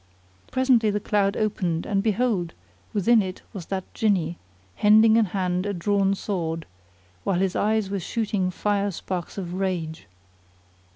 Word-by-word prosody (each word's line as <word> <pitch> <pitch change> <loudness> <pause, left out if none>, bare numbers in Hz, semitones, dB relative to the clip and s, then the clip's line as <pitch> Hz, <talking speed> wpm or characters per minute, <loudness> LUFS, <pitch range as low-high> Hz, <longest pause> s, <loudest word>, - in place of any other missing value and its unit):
Presently 255 -4 +3
the 210 0 0
cloud 205 -1 +1
opened 185 -6 -1
and 195 -1 +1
behold, 210 -5 0 0.4
within 220 +2 +4
it 185 -2 -6
was 190 -6 -7
that 190 -1 -2
Jinni 185 -7 +1 0.4
hending 220 +1 +6
in 225 -1 +4
hand 185 0 -1
a 205 - -1
drawn 195 +2 +1
sword, 165 -5 -3 0.6
while 195 - +1
his 190 0 0
eyes 215 -2 +1
were 200 - -1
shooting 200 0 -1
fire 205 +2 0
sparks 180 -1 -5
of 180 -3 -4
rage. 180 -4 -3
195 Hz, 140 wpm, -25 LUFS, 180-210 Hz, 0.6 s, hending